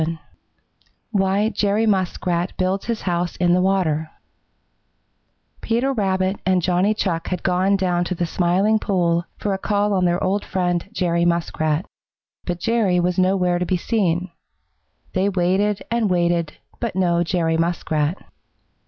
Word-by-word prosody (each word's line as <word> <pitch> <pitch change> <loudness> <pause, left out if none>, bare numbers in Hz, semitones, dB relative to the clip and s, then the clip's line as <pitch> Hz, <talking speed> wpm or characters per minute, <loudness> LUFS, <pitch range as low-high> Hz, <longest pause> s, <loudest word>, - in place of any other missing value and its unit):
VII 165 +1 -1 0.9
WHY 200 +1 +2
JERRY 210 +1 +1
MUSKRAT 185 -3 0
BUILDS 185 +1 -1
HIS 230 -2 -2
HOUSE 175 -1 -1
IN 175 -1 +2
THE 180 - +3
WATER 170 -5 +1 1.5
Peter 245 +4 0
Rabbit 190 -3 0
and 185 -2 +2
Johnny 185 +4 +2
Chuck 170 -6 -2
had 180 -2 -3
gone 190 +2 +2
down 180 -2 +1
to 185 - -2
the 175 - -1
Smiling 185 +6 +2
Pool 175 -4 0
for 205 - -2
a 190 - -3
call 205 0 0
on 185 -2 +2
their 175 +1 +1
old 200 +2 0
friend, 180 -1 -1
Jerry 170 -5 0
Muskrat. 170 -1 0 0.6
But 175 -1 -3
Jerry 210 -3 +1
was 180 +1 0
nowhere 185 -1 +2
to 180 - -1
be 185 - +1
seen. 180 -3 0 0.8
They 190 +1 +1
waited 195 +2 +1
and 230 -3 +1
waited, 170 -3 +1 0.3
but 235 -6 -3
no 175 -2 +2
Jerry 165 -2 0
Muskrat. 165 -1 -1
185 Hz, 145 wpm, -21 LUFS, 175-200 Hz, 1.5 s, THE